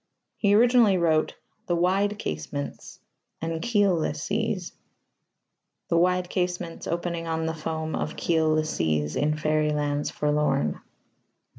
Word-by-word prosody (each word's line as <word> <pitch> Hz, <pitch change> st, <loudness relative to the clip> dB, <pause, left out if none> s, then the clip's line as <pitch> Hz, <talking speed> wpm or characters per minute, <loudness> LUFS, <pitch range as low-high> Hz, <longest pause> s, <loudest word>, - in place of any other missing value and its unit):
He 205 Hz, -1 st, +3 dB
originally 235 Hz, -3 st, +5 dB
wrote 160 Hz, -3 st, +2 dB, 0.3 s
"the 175 Hz, -, +1 dB
wide 195 Hz, +4 st, +1 dB
casements" 80 Hz, -, -5 dB, 0.4 s
and 165 Hz, 0 st, -3 dB
"keelless 200 Hz, -10 st, +2 dB
seas": 205 Hz, -3 st, -2 dB, 1.2 s
the 170 Hz, -, +2 dB
wide 180 Hz, +1 st, +2 dB
casements, 180 Hz, -2 st, -3 dB
opening 170 Hz, -1 st, -2 dB
on 160 Hz, 0 st, -1 dB
the 160 Hz, -, -1 dB
foam 160 Hz, 0 st, -3 dB
Of -, -, -3 dB
keelless 155 Hz, -2 st, +1 dB
seas, 75 Hz, -2 st, 0 dB
in 150 Hz, +1 st, +1 dB
fairy 155 Hz, 0 st, +1 dB
lands 145 Hz, -1 st, -1 dB
forlorn. 150 Hz, -, 0 dB
165 Hz, 120 wpm, -26 LUFS, 150-180 Hz, 1.2 s, originally